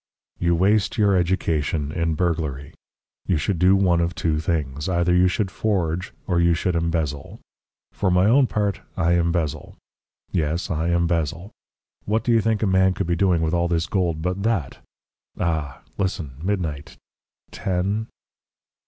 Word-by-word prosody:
"You 85 Hz, 0 st, +2 dB
waste 100 Hz, +4 st, +2 dB
your 100 Hz, -3 st, +3 dB
education 80 Hz, -5 st, 0 dB
in 85 Hz, -1 st, -1 dB
burglary. 75 Hz, -4 st, -2 dB, 0.5 s
You 90 Hz, -, +2 dB
should 85 Hz, +4 st, -1 dB
do 90 Hz, +2 st, +5 dB
one 90 Hz, -3 st, +3 dB
of 85 Hz, +1 st, -1 dB
two 80 Hz, -2 st, 0 dB
things. 75 Hz, -2 st, -2 dB
Either 85 Hz, 0 st, +2 dB
you 90 Hz, +1 st, +5 dB
should 95 Hz, +1 st, -1 dB
forge 90 Hz, -5 st, -1 dB
or 90 Hz, -2 st, +1 dB
you 85 Hz, 0 st, +3 dB
should 90 Hz, +1 st, -1 dB
embezzle. 80 Hz, -4 st, -2 dB, 0.5 s
For 95 Hz, -, 0 dB
my 90 Hz, +1 st, +3 dB
own 130 Hz, +5 st, +5 dB
part, 100 Hz, -3 st, -1 dB, 0.2 s
I 85 Hz, -2 st, +2 dB
embezzle. 85 Hz, -3 st, -1 dB, 0.5 s
Yes; 85 Hz, +3 st, -1 dB
I 80 Hz, 0 st, -1 dB
embezzle. 85 Hz, +1 st, 0 dB, 0.5 s
What 110 Hz, +2 st, 0 dB
do 120 Hz, -, +1 dB
you 115 Hz, -1 st, +4 dB
think 110 Hz, 0 st, 0 dB
a -, -, +3 dB
man 95 Hz, -1 st, +3 dB
could 100 Hz, -, -2 dB
be 85 Hz, 0 st, 0 dB
doing 85 Hz, -2 st, +2 dB
with 80 Hz, +1 st, 0 dB
all 85 Hz, 0 st, +2 dB
this 85 Hz, -1 st, 0 dB
gold 85 Hz, -2 st, -1 dB
but 90 Hz, +2 st, -2 dB
that? 95 Hz, -, -1 dB, 0.6 s
Ah! 80 Hz, -6 st, -2 dB, 0.2 s
Listen! 95 Hz, -7 st, -2 dB
Midnight!... 85 Hz, -7 st, -3 dB, 0.5 s
Ten. 100 Hz, +4 st, -2 dB
85 Hz, 155 wpm, -23 LUFS, 80-95 Hz, 0.6 s, do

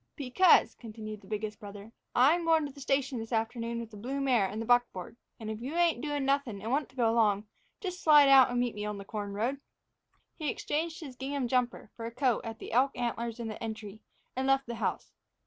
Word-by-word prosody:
"Because," 285 Hz, +6 st, +4 dB
continued 215 Hz, -2 st, -8 dB
the 190 Hz, -, -17 dB
biggest 215 Hz, 0 st, -4 dB
brother, 205 Hz, 0 st, -10 dB, 0.2 s
"I'm 300 Hz, +8 st, +5 dB
goin' 325 Hz, -2 st, +3 dB
to 285 Hz, -, -6 dB
the 280 Hz, +1 st, -13 dB
station 275 Hz, -2 st, 0 dB
this 225 Hz, +1 st, -7 dB
afternoon 230 Hz, +1 st, -1 dB
with 230 Hz, -1 st, -7 dB
the 210 Hz, -, -10 dB
blue 260 Hz, +7 st, -4 dB
mare 250 Hz, -8 st, +2 dB
and 210 Hz, +3 st, -5 dB
the 225 Hz, -, -3 dB
buckboard. 240 Hz, -6 st, +1 dB, 0.2 s
And 220 Hz, -, -7 dB
if 220 Hz, +1 st, -6 dB
you 270 Hz, +6 st, -5 dB
ain't 340 Hz, -7 st, +2 dB
doin' 290 Hz, -2 st, -2 dB
nothing 275 Hz, -7 st, 0 dB
and 220 Hz, +4 st, -4 dB
want 285 Hz, +2 st, 0 dB
to 260 Hz, -, -22 dB
go 240 Hz, -3 st, +2 dB
along, 215 Hz, -3 st, +2 dB, 0.3 s
just 365 Hz, -3 st, -5 dB
slide 295 Hz, -2 st, +7 dB
out 270 Hz, -2 st, +8 dB
and 245 Hz, 0 st, -1 dB
meet 245 Hz, -1 st, 0 dB
me 210 Hz, -, -5 dB
on 210 Hz, -1 st, -3 dB
the 200 Hz, -, -8 dB
corn 205 Hz, -1 st, -5 dB
road." 250 Hz, +7 st, -1 dB, 0.7 s
He 305 Hz, -3 st, -3 dB
exchanged 320 Hz, +6 st, -2 dB
his 275 Hz, -5 st, -8 dB
gingham 270 Hz, 0 st, -3 dB
jumper 245 Hz, -3 st, -1 dB
for 230 Hz, -1 st, -5 dB
a -, -, -6 dB
coat 250 Hz, -1 st, +1 dB
at 225 Hz, -1 st, -6 dB
the -, -, -9 dB
elk 260 Hz, +4 st, +2 dB
antlers 235 Hz, -1 st, -3 dB
in 235 Hz, -, -4 dB
the 215 Hz, -, -7 dB
entry, 215 Hz, -2 st, -6 dB, 0.3 s
and 260 Hz, +1 st, -1 dB
left 270 Hz, 0 st, +3 dB
the 235 Hz, -, -5 dB
house. 230 Hz, -, -3 dB
245 Hz, 230 wpm, -30 LUFS, 220-275 Hz, 0.7 s, out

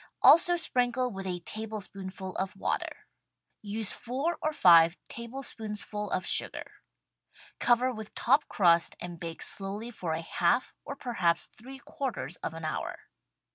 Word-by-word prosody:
Also 350 Hz, +2 st, +7 dB
sprinkle 250 Hz, -5 st, +1 dB
with 195 Hz, -1 st, -6 dB
a 180 Hz, -1 st, -3 dB
tablespoonful 195 Hz, -2 st, -5 dB
of 195 Hz, +1 st, -2 dB
water. -, -, -3 dB, 0.6 s
Use 210 Hz, 0 st, -1 dB
four 275 Hz, +8 st, -2 dB
or 310 Hz, -, 0 dB
five 170 Hz, -, +6 dB
tablespoonsful 220 Hz, -4 st, -3 dB
of 185 Hz, -, -1 dB
sugar. -, -, -1 dB, 0.8 s
Cover 245 Hz, +1 st, +3 dB
with 220 Hz, -2 st, -9 dB
top 275 Hz, +5 st, +3 dB
crust 170 Hz, -3 st, +3 dB
and 175 Hz, -1 st, -7 dB
bake 165 Hz, -1 st, -5 dB
slowly 205 Hz, +4 st, -2 dB
for 175 Hz, -8 st, -3 dB
a 160 Hz, -, -2 dB
half, 175 Hz, +8 st, +1 dB
or 280 Hz, -, -6 dB
perhaps 185 Hz, -11 st, 0 dB
three 265 Hz, +4 st, -11 dB
quarters 245 Hz, -, -5 dB
of 160 Hz, -, -5 dB
an 165 Hz, -1 st, -6 dB
hour. 155 Hz, -, -5 dB
210 Hz, 135 wpm, -29 LUFS, 180-245 Hz, 0.8 s, Also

